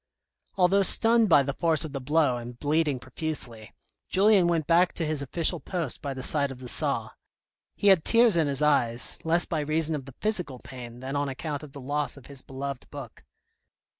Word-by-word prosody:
Although 190 Hz, +2 st, +4 dB
stunned 225 Hz, +2 st, +5 dB
by 145 Hz, -4 st, +6 dB
the 140 Hz, +1 st, -3 dB
force 160 Hz, 0 st, +2 dB
of 150 Hz, -, -8 dB
the 135 Hz, -, -4 dB
blow 145 Hz, -2 st, +1 dB
and 120 Hz, 0 st, -9 dB
bleeding 150 Hz, 0 st, 0 dB
profusely, 125 Hz, -4 st, -6 dB, 0.3 s
Julien 195 Hz, -2 st, +4 dB
went 165 Hz, -3 st, 0 dB
back 175 Hz, +3 st, +3 dB
to 165 Hz, -, -2 dB
his 155 Hz, -2 st, -1 dB
official 165 Hz, +5 st, -2 dB
post 165 Hz, -9 st, -4 dB
by 140 Hz, -2 st, -4 dB
the 130 Hz, -, -6 dB
side 140 Hz, -1 st, +2 dB
of 135 Hz, -, -8 dB
the 125 Hz, 0 st, -10 dB
saw. -, -, -1 dB, 0.6 s
He 205 Hz, -, +2 dB
had 185 Hz, -5 st, +5 dB
tears 230 Hz, -3 st, +4 dB
in 160 Hz, -3 st, +2 dB
his 140 Hz, +1 st, -1 dB
eyes, 120 Hz, -5 st, +1 dB
less 165 Hz, +2 st, +2 dB
by 160 Hz, -, -2 dB
reason 155 Hz, +2 st, 0 dB
of 140 Hz, -4 st, -4 dB
the 135 Hz, -, -13 dB
physical 180 Hz, -11 st, -1 dB
pain 125 Hz, -1 st, -10 dB
than 135 Hz, +2 st, -5 dB
on 145 Hz, 0 st, -1 dB
account 145 Hz, +2 st, -5 dB
of 150 Hz, -3 st, -12 dB
the 140 Hz, -, -8 dB
loss 145 Hz, +2 st, -3 dB
of 135 Hz, -, -14 dB
his 140 Hz, -2 st, -9 dB
beloved 135 Hz, 0 st, -7 dB
book. 140 Hz, -6 st, -10 dB
145 Hz, 200 wpm, -26 LUFS, 135-165 Hz, 0.6 s, by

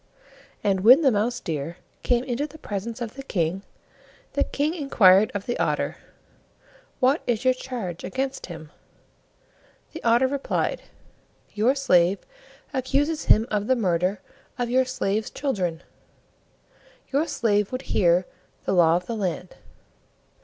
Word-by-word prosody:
And 195 Hz, -2 st, +2 dB
when 245 Hz, -, +7 dB
the 275 Hz, -4 st, +4 dB
Mouse 230 Hz, +3 st, 0 dB
deer 160 Hz, +2 st, -4 dB, 0.2 s
came 245 Hz, -1 st, +1 dB
into 260 Hz, +3 st, -2 dB
the 315 Hz, -, -14 dB
presence 225 Hz, -2 st, -5 dB
of 230 Hz, -2 st, -4 dB
the 275 Hz, -, -8 dB
King, 185 Hz, -7 st, -1 dB, 0.7 s
the -, -, +2 dB
King 295 Hz, +3 st, -1 dB
inquired 215 Hz, -, +5 dB
of 205 Hz, -, -3 dB
the 240 Hz, -, -3 dB
Otter, -, -, -1 dB, 1.0 s
"What 270 Hz, +4 st, +3 dB
is 240 Hz, 0 st, 0 dB
your 255 Hz, -, +5 dB
charge 240 Hz, -9 st, -6 dB
against 265 Hz, +8 st, -3 dB
him?" 160 Hz, -3 st, -10 dB, 1.2 s
The 325 Hz, -, -8 dB
Otter 235 Hz, +2 st, +4 dB
replied, 280 Hz, -, -1 dB, 0.7 s
"Your 230 Hz, +6 st, +2 dB
slave 185 Hz, -9 st, +3 dB, 0.6 s
accuses 280 Hz, +4 st, 0 dB
him 220 Hz, -, +5 dB
of 210 Hz, 0 st, -1 dB
the 260 Hz, -, +3 dB
murder 185 Hz, -2 st, 0 dB, 0.4 s
of 240 Hz, -1 st, -2 dB
your 260 Hz, +1 st, +3 dB
slave's 215 Hz, -4 st, -2 dB
children; 185 Hz, -, -2 dB, 1.3 s
your 290 Hz, +4 st, +1 dB
slave 210 Hz, -8 st, +1 dB
would 255 Hz, +1 st, -4 dB
hear 175 Hz, 0 st, +3 dB, 0.4 s
the -, -, 0 dB
Law 170 Hz, -2 st, +5 dB
of 180 Hz, +1 st, -2 dB
the 230 Hz, -, -4 dB
Land." 185 Hz, -3 st, -3 dB
225 Hz, 140 wpm, -24 LUFS, 185-260 Hz, 1.3 s, when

